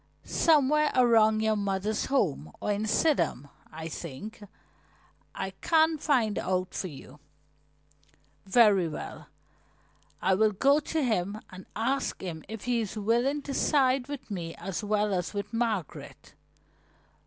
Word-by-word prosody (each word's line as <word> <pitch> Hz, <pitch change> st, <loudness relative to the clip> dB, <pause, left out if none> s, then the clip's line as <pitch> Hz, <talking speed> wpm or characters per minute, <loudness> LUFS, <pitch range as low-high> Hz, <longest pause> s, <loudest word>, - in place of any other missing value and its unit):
"Somewhere 300 Hz, -1 st, +3 dB
around 225 Hz, -3 st, +4 dB
your 220 Hz, 0 st, +2 dB
mother's 200 Hz, +1 st, -1 dB
home, 165 Hz, -, 0 dB
or -, -, -1 dB
in 210 Hz, +2 st, -1 dB
Sidham, 210 Hz, -, +1 dB, 0.2 s
I 160 Hz, +1 st, -6 dB
think. 170 Hz, +8 st, -8 dB, 0.9 s
I 190 Hz, -, -3 dB
can 320 Hz, -1 st, +3 dB
find 245 Hz, -9 st, +1 dB
out 185 Hz, 0 st, -1 dB
for 185 Hz, -, -3 dB
you." 145 Hz, -2 st, -12 dB, 1.3 s
"Very 200 Hz, -4 st, +5 dB
well, 155 Hz, -, -7 dB, 0.9 s
I 190 Hz, -, +2 dB
will 215 Hz, +2 st, +3 dB
go 275 Hz, +8 st, +4 dB
to 310 Hz, 0 st, -2 dB
him 210 Hz, -3 st, -1 dB
and 185 Hz, 0 st, -11 dB
ask 260 Hz, +5 st, -1 dB
him 165 Hz, -4 st, -6 dB
if 220 Hz, -1 st, -7 dB
he 245 Hz, -2 st, +1 dB
is 215 Hz, 0 st, -5 dB
willing 240 Hz, +7 st, +1 dB
to 280 Hz, -, -5 dB
side 265 Hz, -3 st, +2 dB
with 285 Hz, -6 st, -7 dB
me 170 Hz, -4 st, -4 dB
as 195 Hz, +4 st, -5 dB
well 210 Hz, 0 st, +1 dB
as 180 Hz, +2 st, -2 dB
with 200 Hz, +2 st, -4 dB
Margaret. 225 Hz, -8 st, -3 dB
215 Hz, 135 wpm, -28 LUFS, 190-255 Hz, 1.3 s, Very